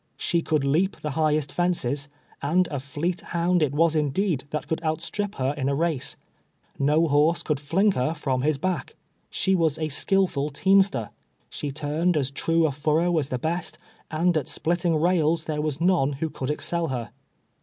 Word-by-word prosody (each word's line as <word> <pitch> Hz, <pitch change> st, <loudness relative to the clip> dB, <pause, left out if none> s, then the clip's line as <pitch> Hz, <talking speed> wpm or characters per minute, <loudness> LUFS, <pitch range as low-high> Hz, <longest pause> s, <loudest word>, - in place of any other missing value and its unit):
She 170 Hz, -, 0 dB
could 155 Hz, -3 st, 0 dB
lea}) 155 Hz, +7 st, +3 dB, 0.2 s
the 150 Hz, -, -2 dB
highest 155 Hz, 0 st, +1 dB
fences, 145 Hz, -6 st, -1 dB, 0.3 s
and 175 Hz, +5 st, +2 dB
a 145 Hz, -, -2 dB
fleet 160 Hz, +6 st, -3 dB
hound 175 Hz, +1 st, 0 dB
it 150 Hz, -3 st, +2 dB
was 160 Hz, +2 st, +2 dB
indeed, 150 Hz, 0 st, 0 dB
that 150 Hz, -, -4 dB
could 160 Hz, -, -2 dB
outstrip 170 Hz, +6 st, -2 dB
her 135 Hz, +1 st, 0 dB
in 135 Hz, -2 st, -1 dB
a 140 Hz, -, +1 dB
race. 160 Hz, -3 st, -1 dB, 0.6 s
Xo 150 Hz, +4 st, +3 dB
horse 150 Hz, +3 st, +3 dB
could 150 Hz, -3 st, -1 dB
liingher 165 Hz, -1 st, +1 dB
from 130 Hz, -3 st, -1 dB
las 150 Hz, +1 st, +1 dB
back. 185 Hz, +5 st, -3 dB, 0.3 s
She 190 Hz, -, +1 dB
was 160 Hz, -5 st, +2 dB
a 155 Hz, -1 st, -2 dB
skillful 155 Hz, -2 st, +1 dB
teamster. 190 Hz, -, +2 dB, 0.4 s
She 145 Hz, -, -4 dB
turned 155 Hz, +4 st, 0 dB
as 135 Hz, -2 st, 0 dB
true 165 Hz, +3 st, +1 dB
a 155 Hz, -, +1 dB
furrow 155 Hz, +5 st, +1 dB
as 140 Hz, -2 st, -3 dB
the 125 Hz, -, -1 dB
best, 165 Hz, +7 st, -3 dB, 0.3 s
and 170 Hz, +2 st, +1 dB
at 145 Hz, -, -2 dB
splitting 170 Hz, 0 st, 0 dB
rails 165 Hz, -1 st, +2 dB
there 150 Hz, -1 st, -2 dB
were 155 Hz, -, 0 dB
none 165 Hz, -5 st, +2 dB
who 155 Hz, +3 st, -3 dB
could 130 Hz, -, -4 dB
excel 170 Hz, +3 st, -1 dB
her. 125 Hz, -5 st, -4 dB
155 Hz, 175 wpm, -25 LUFS, 145-170 Hz, 0.6 s, lea